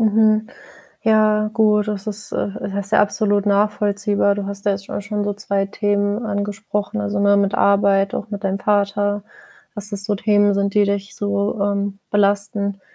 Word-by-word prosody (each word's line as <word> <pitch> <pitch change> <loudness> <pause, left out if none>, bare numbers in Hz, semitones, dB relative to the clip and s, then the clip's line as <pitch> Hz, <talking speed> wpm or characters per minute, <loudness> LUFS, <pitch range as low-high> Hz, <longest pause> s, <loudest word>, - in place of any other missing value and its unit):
Mhm. 215 0 +3 0.6
Ja, 215 -1 +3
gut, 215 -1 +3
das 205 0 -4
ist, 210 0 -4
äh - - -1
ja, - - -5 0.2
das 200 0 -3
ist - - -11
ja, - - +4
absolut 205 -1 +1
nachvollziehbar. 205 0 +1
Du 200 -1 -4
hast 200 0 -7
ja 205 - +3
jetzt 195 0 -4
scho - - -9
auch - - -3
schon 205 0 -3
so 205 - -1
2 200 -1 -2
Themen 205 +2 -1
angesprochen, 205 - -3
also, 100 0 -2
ne, 200 0 +4
mit 200 0 +1
Arbeit, 195 0 +3
auch 210 - -5
mit 200 0 -5
deinem 195 0 0
Vater, 205 0 0 0.5
dass 205 -1 -4
das 200 0 +3
so 205 -1 0
Themen 205 0 +3
sind, 200 0 0
die 210 - +4
dich 200 0 -2
so, 205 +1 -1
ähm, 200 0 -1
belasten. 200 -1 0
205 Hz, 190 wpm, -20 LUFS, 200-210 Hz, 0.6 s, ja